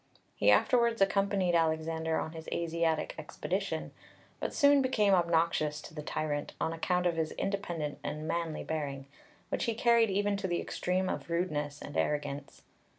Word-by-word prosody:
He 100 - +3
afterwards 235 - +4
accompanied 195 -2 +2
Alexander 160 0 +1
on - - -2
his 160 -1 -8
Asiatic 165 -1 0
expedition, - - -3 0.5
but - - -2
soon 285 -1 +5
became 215 -6 +3
obnoxious 165 -3 +2
to - - -11
the 150 - -5
tyrant 150 -1 -3
on 160 - 0
account 180 +2 0
of 170 -2 +1
his 160 -1 -1
independent 175 -7 -3
and 155 +1 -4
manly 165 -2 -2
bearing, 140 -4 -3 0.4
which - - -1
he 230 - 0
carried 235 -1 +4
even 200 +1 +1
to 195 - -2
the 175 -1 0
extreme 185 +1 -1
of 185 - -4
rudeness 150 -4 -2
and 145 - -8
arrogance. 145 -1 -2
165 Hz, 155 wpm, -31 LUFS, 155-195 Hz, 0.5 s, soon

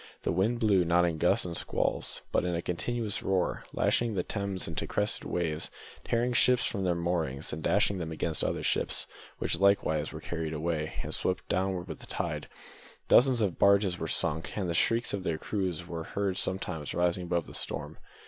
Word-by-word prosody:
The - - 0
wind 105 +7 +1
blew, 100 -6 +4
not 85 +1 +3
in 80 -2 -1
gusts - - +3
and 85 -1 -4
squalls, - - 0
but - - +2
in 90 -1 -1
one 85 - -1
continuous 110 +4 -2
roar, 95 -2 0
lashing 115 -3 +1
the 90 - 0
Thames 100 -3 -2
into 80 - -3
crested - - -1
waves, 80 -3 -2 0.3
tearing 120 +1 0
ships 125 +1 +4
from 100 -3 -2
their 90 -2 +1
moorings, 85 -5 -2
and 80 - -4
dashing 95 +5 +2
them 80 -2 -4
against 80 0 -2
other - - -1
ships, - - +1 0.3
which - - -1
were 85 - -8
likewise 80 -6 +3
carried 80 -2 -3
away, 80 0 -2
and - - -3
swept 95 0 -2
downward 95 -1 -1
with 80 - -7
the - - -9
tide. - - -3 0.6
Dozens 125 -2 +6
of 100 -5 0
barges 100 -2 +4
were 80 - -3
sunk, 80 +3 0
and 95 -3 -1
the 85 - -1
shrieks 115 +7 +2
of 100 - -1
their 85 -4 -1
crews 90 -3 -2
were 85 -2 -5
heard 100 +2 -2
sometimes 90 -6 -1
rising 90 +1 +1
above 85 -1 0
the - - -11
storm. - - -3
90 Hz, 195 wpm, -30 LUFS, 85-100 Hz, 0.6 s, Dozens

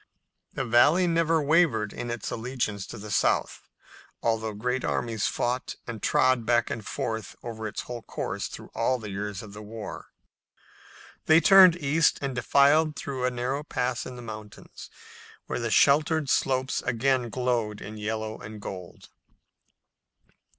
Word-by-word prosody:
The - - -2
Valley 145 +10 +5
never 165 -1 +2
wavered 145 -9 +2
in 120 - -5
its 120 -2 -4
allegiance 110 -4 -3
to - - -8
the 105 0 -8
South, - - +1 0.6
although 110 -2 0
great 125 +4 -2
armies 115 -4 -1
fought 125 +2 -2
and 115 -3 -7
trod 130 -2 +3
back 120 +1 +1
and 110 - -4
forth 110 +1 -4
over 110 -2 -5
its 105 - -5
whole 120 -1 -7
course - - -4
through - - -10
all 120 +3 +1
the 110 -4 -7
years 100 0 -4
of 105 -2 -11
the 105 - -9
war. 110 0 -8 1.2
They 160 +1 +7
turned 185 -1 +8
east 155 -1 +2
and 140 -2 -3
defiled 145 +5 +3
through 135 -3 -3
a - - +3
narrow 125 +3 -2
pass 125 -4 -2
in 130 - -8
the 120 - -9
mountains, 110 -2 -10 0.6
where - - -3
the 115 -1 -2
sheltered 150 +3 +3
slopes 130 0 +1
again 125 0 0
glowed 120 -4 -1
in 110 +1 -8
yellow 110 +1 -3
and 105 0 -9
gold. 90 -3 -9
120 Hz, 150 wpm, -27 LUFS, 110-140 Hz, 1.2 s, turned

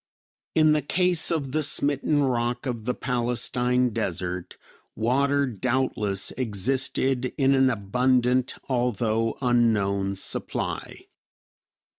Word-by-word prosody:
In 155 -1 +5
the 150 0 +2
case 180 +4 +2
of 145 -6 -2
the 155 +3 0
smitten 145 0 +2
rock 120 -1 -1
of 115 -4 -4
the 125 - -1
Palestine 125 0 0
desert 90 -2 -4 0.4
water 140 +5 +1
doubtless 115 -4 -1
existed 130 +3 -1
in 135 -1 +3
an 135 -1 +4
abundant, 125 +3 +1
although 115 -3 0
unknown 100 -5 +1
supply. 95 - -4
125 Hz, 100 wpm, -25 LUFS, 115-135 Hz, 0.4 s, In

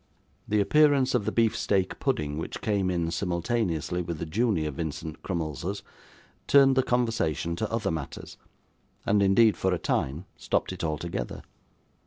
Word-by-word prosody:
The 105 0 +2
appearance 140 +3 +4
of 120 -5 +1
the 110 - 0
beef 115 -1 +2
steak 95 -2 0
pudding, 75 0 -1
which - - -5
came 100 -3 0
in 85 -2 -1
simultaneously 90 -1 -1
with 85 -2 -4
the - - -4
junior 85 -4 0
Vincent 80 +1 -5
Crummleses, 85 +2 -3 0.6
turned 135 -1 +6
the 130 - +4
conversation 115 - 0
to - - -2
other 110 -5 -1
matters, 80 -4 -6 0.7
and 100 0 +3
indeed, 100 +2 +5
for 95 - 0
a 90 - +1
time, 75 +2 -2
stopped - - -1
it 90 - -7
altogether. 80 +2 -3
95 Hz, 150 wpm, -27 LUFS, 80-110 Hz, 0.7 s, turned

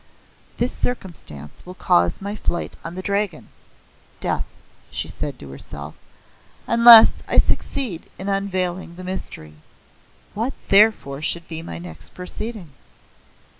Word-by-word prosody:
"This 245 +1 0
circumstance 160 - -5
will 180 +1 -10
cause 85 - +2
my 200 +1 -3
flight 175 -4 -3
on 165 - -6
the 185 - -5
Dragon 200 -4 -2 0.7
(death)," - - -1 0.4
she - - -4
said - - -4
to 70 - -10
herself, 70 +2 -9 0.7
"unless 235 -1 +9
I - - 0
succeed 220 -12 0
in 190 - -6
unveiling 185 -3 -2
the 185 - -9
mystery. 80 - -7 0.8
What 230 +6 -2 0.2
therefore 195 -9 +4
should 170 +2 -2
be 160 -1 -4
my 85 - -7
next 85 -1 -10
proceeding?" 185 -1 -7
180 Hz, 125 wpm, -22 LUFS, 145-205 Hz, 0.8 s, unless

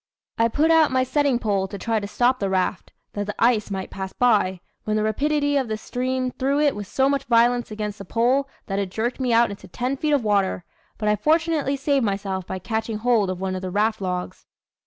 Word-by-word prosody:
I 230 - +5
put 300 +7 +2
out 320 -2 +5
my 260 0 +2
setting 280 -1 +1
pole 200 -5 0
to 200 - -7
try 225 +2 -1
to 200 - -5
stop 250 +4 +1
the 195 - -1
raft, 185 -1 -1 0.2
that 205 0 -3
the 210 - -4
ice 230 -3 +2
might 190 -1 -4
pass 190 -1 -6
by, 205 -7 +2 0.2
when 215 - -1
the 215 - +1
rapidity 285 +5 +1
of 265 -3 0
the 215 -1 -2
stream 255 +2 -2
threw 275 +3 0
it 295 -2 +2
with 205 -1 -6
so 265 +4 +1
much 275 -1 0
violence 240 0 +3
against 210 -1 -5
the 200 - -8
pole, 255 +7 +1 0.2
that 195 0 -2
it 195 -2 -2
jerked 230 +7 -2
me 255 -2 0
out 230 -1 +4
into 200 -1 -10
ten 250 +8 -2
feet 300 +2 0
of 280 -4 +2
water; 200 -4 +1 0.3
but 210 - -2
I 210 - +4
fortunately 310 +3 +1
saved 275 -1 +1
myself 195 -3 -2
by 190 - -4
catching 220 +4 -3
hold 220 -3 +2
of 185 -1 -3
one 190 0 -2
of 185 - -4
the 185 - -4
raft 215 +3 0
logs. 180 -1 -4
225 Hz, 230 wpm, -23 LUFS, 200-265 Hz, 0.3 s, I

